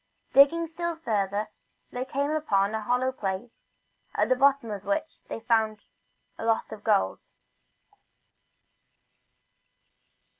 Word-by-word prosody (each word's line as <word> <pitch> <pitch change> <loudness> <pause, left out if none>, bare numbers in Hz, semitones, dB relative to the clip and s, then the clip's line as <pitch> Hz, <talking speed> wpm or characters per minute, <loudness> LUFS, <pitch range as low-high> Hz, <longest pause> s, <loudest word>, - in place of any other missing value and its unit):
Digging 285 +5 +6
still 340 +1 -3
further 210 -10 -1
along, 210 +1 -1 0.4
they 250 +1 -3
came 280 +2 -1
upon 210 -10 +1
a 220 - -1
hollow 250 +4 +1
place, 200 -1 -5 0.5
at - - +2
the 255 - +5
bottom 275 -3 +3
of 200 -2 -5
which 310 +1 -2
they - - -5
found 220 -2 +1 0.6
a - - -5
lot 225 0 0
of 215 - -9
gold. 95 0 +1
240 Hz, 120 wpm, -27 LUFS, 210-280 Hz, 0.6 s, Digging